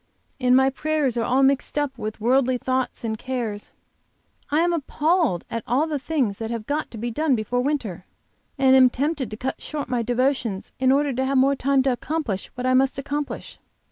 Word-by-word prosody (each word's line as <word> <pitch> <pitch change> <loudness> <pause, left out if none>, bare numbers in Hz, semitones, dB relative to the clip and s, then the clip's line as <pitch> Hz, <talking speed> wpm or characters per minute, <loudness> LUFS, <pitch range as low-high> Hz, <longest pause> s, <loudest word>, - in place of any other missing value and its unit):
And 250 -1 +4
my 265 0 +4
prayers 295 -2 0
are 235 - 0
all 260 +3 +2
mixed 275 +2 +1
up 290 -2 0
with 215 -2 -5
worldly 255 +3 +2
thoughts 255 0 -2
and 220 -1 -3
cares. 235 -5 -4 0.8
I 300 +2 +2
am 345 0 +2
appalled 315 - +1
at 230 -1 -4
all 260 +6 +2
the 305 -3 -2
things 265 -9 -1
that 225 -1 -4
have 230 -2 -4
got 295 +4 -2
to 230 - -9
be 235 +2 -3
done 300 +2 +1
before 245 +2 -1
winter, 250 - -2 0.5
and 265 -1 +5
am 260 -1 +7
tempted 280 -1 -2
to 215 - -7
cut 260 +3 -4
short 295 -4 -5
my 245 -2 0
devotions 245 -4 -1
in 260 0 +4
order 280 0 +2
to 260 +2 -1
have 270 0 +1
more 270 +2 +4
time 270 0 +2
to 265 - +2
accomplish 250 -6 -3
what 250 - -4
I 255 - +3
must 265 +1 +3
accomplish. 290 +1 -4
260 Hz, 205 wpm, -23 LUFS, 240-285 Hz, 0.8 s, am